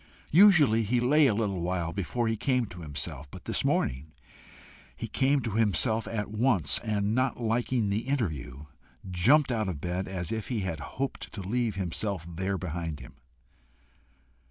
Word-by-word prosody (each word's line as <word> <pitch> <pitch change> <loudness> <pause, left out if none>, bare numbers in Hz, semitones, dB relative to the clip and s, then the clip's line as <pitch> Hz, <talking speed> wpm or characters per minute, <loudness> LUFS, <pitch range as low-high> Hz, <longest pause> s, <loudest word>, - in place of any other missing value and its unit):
Usually 160 - +6
he 115 +3 +1
lay 145 +5 +4
a 115 - +2
little 100 -5 -1
while 85 -1 -2
before 115 +5 -2
he 110 - +1
came 125 +2 +1
to 90 -4 -10
himself; 70 -1 -5
but - - -11
this - - -1
morning 70 +5 -1 0.8
he - - -5
came 135 +1 +2
to 115 -2 -3
himself 110 +2 +1
at 105 -2 -3
once, 105 - +2
and 105 -2 -1
not 130 +1 0
liking 115 -1 0
the 110 +5 -2
interview, 80 - -3 0.5
jumped 130 - +4
out 110 -4 0
of 85 -6 -4
bed 90 +3 -3
as 90 -3 -4
if 110 -2 -3
he 120 -5 -2
had 85 -5 -3 0.2
hoped 135 +1 -3
to 100 - -5
leave 115 +2 -1
himself 95 -1 -2
there 95 +3 -2
behind 85 -3 -4
him. 65 -1 -12
105 Hz, 165 wpm, -28 LUFS, 85-120 Hz, 0.8 s, Usually